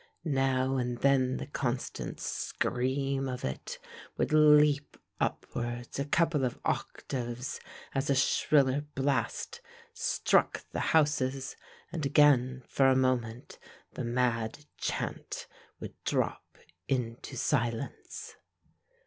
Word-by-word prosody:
Now 135 -2 +1
and 125 -1 -1
then 130 -2 +3
the - - -4
constant 130 -3 -3
scream 135 +2 -1
of 125 -1 -4
it 65 - -4 0.4
would - - 0
leap 150 -1 +5 0.2
upwards 120 +1 -3
a 140 - 0
couple 160 -1 +2
of 125 - -1
octaves 125 -1 -3 0.3
as 135 +1 -1
a 140 - +4
shriller 135 0 +3
blast 140 - -1 0.3
struck 470 +2 +2
the - - -2 0.2
houses 135 -3 +2 0.4
and 165 -3 -3
again 135 -3 +4
for 135 - +3
a 130 - +5
moment 125 -2 0 0.3
the - - -4
mad 120 +2 0
chant - - -3 0.3
would - - -7
drop - - -1 0.3
into 120 -3 -2
silence. 120 -2 -2
135 Hz, 105 wpm, -30 LUFS, 125-145 Hz, 0.4 s, leap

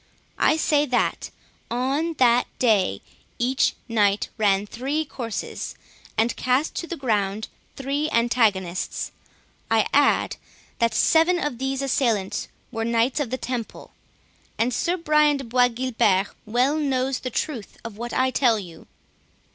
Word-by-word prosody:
I 310 - +4
say 295 -1 +2
that, 250 -2 0 0.4
on 270 +7 0
that 245 -4 +3
day, 205 - +2 0.4
each 255 +2 +1
knight 205 -3 +2
ran 205 -2 +2
three 275 +8 -2
courses, 235 -6 -5 0.4
and 225 +2 +2
cast 255 +5 +1
to 340 - -3
the 340 - -5
ground 215 -5 -1 0.3
three 280 +3 -1
antagonists. 220 - 0 0.6
I 225 -1 +3
add, 285 0 +3 0.4
that 230 -2 +2
seven 330 +7 +4
of 295 -7 -3
these 270 +1 -2
assailants 230 -8 0 0.2
were 225 -2 -3
Knights 235 +4 +1
of 285 -5 -1
the 260 - -2
Temple—and 245 0 -6
Sir 345 +9 0
Brian 300 -3 +3
de 270 - -6
Bois 245 +1 +3
Guilbert 230 -6 +1 0.2
well 250 +7 +2
knows 265 -3 0
the 255 - -4
truth 245 -3 -4
of 230 -3 -6
what 240 +1 -5
I 260 0 +1
tell 245 -4 +3
you." 175 -5 -10
250 Hz, 135 wpm, -24 LUFS, 225-275 Hz, 0.6 s, I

